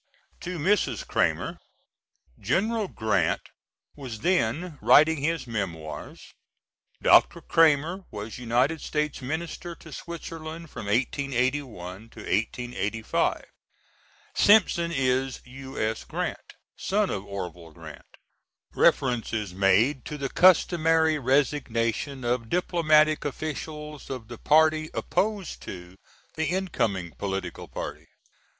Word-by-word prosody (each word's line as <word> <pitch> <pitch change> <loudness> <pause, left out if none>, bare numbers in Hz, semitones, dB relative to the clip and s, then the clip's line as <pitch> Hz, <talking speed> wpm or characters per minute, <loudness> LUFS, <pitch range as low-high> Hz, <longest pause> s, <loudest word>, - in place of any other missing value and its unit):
[To 180 0 -5
Mrs. 205 - +1
Cramer. - - 0 0.8
General 220 +1 0
Grant 100 - 0 0.5
was 125 -7 -7
then 170 -1 0
writing 155 +2 +6
his 150 0 -1
Memoirs. 90 -9 -6 0.7
Dr. - - +6
Cramer 165 +4 +3
was 105 +3 -7
United 125 +6 +1
States 150 -2 -2
Minister 165 +5 -4
to 160 - -14
Switzerland 165 -1 -7
from 100 - -7
1881 130 +4 0 0.4
to 115 - -14
1885. 115 0 -1 0.9
Simpson 180 -5 +4
is 130 -2 0
U.S. 130 -4 -4
Grant, - - -4 0.2
son 205 +1 0
of 100 - -3
Orvil 90 -4 -7
Grant. 80 -3 -13 0.6
Reference 120 -4 +2
is 105 -5 -2
made 100 +9 +3
to 150 - -5
the 135 -1 -3
customary 165 -3 +4
resignation 130 -1 0
of 120 -1 -1
diplomatic 155 -3 +3
officials 150 +1 -5
of 125 -4 -6
the 120 - -8
party 155 0 +4
opposed 205 -3 -1
to 90 0 -9 0.4
the 160 0 -1
incoming 110 - -1
political 95 -3 -4
party. - - -7
140 Hz, 105 wpm, -26 LUFS, 115-160 Hz, 0.9 s, writing